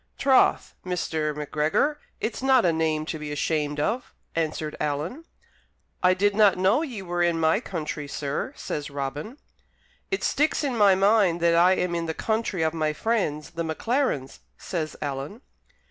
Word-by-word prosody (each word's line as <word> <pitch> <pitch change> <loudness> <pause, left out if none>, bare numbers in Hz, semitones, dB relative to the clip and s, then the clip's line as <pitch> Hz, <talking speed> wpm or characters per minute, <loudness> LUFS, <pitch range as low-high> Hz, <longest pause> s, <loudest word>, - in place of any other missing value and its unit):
"Troth, 270 -2 +3
Mr. 160 -4 -2
Macgregor, 155 - 0 0.2
it's 225 - -3
not 265 -4 +4
a 170 - +3
name 160 -1 0
to 160 -1 -4
be 150 -1 -5
ashamed 150 0 -1
of," 230 +11 -2 0.2
answered 155 -1 -2
Alan. 150 - -3 0.8
"I 185 0 +4
did 200 +2 +2
not 205 -3 +5
know 190 +10 +3
ye 245 -11 -5
were 175 -1 -2
in 170 -1 +2
my 160 +4 +3
country, 155 - -5
sir," 140 0 -3
says 150 -1 -4
Robin. 145 - -5 0.7
"It 390 - -2
sticks 300 +2 +1
in 270 -4 -1
my 205 -4 +5
mind 195 -3 +3
that 170 0 +4
I 175 +2 +5
am 180 -2 -1
in 170 -1 -2
the 160 - -3
country 220 -6 -1
of 160 0 +1
my 155 -2 0
friends, 155 -6 -1
the 170 0 -3
Maclarens," 160 - -1 0.2
says 160 -4 -4
Alan. 145 - -5
170 Hz, 160 wpm, -25 LUFS, 155-215 Hz, 0.8 s, not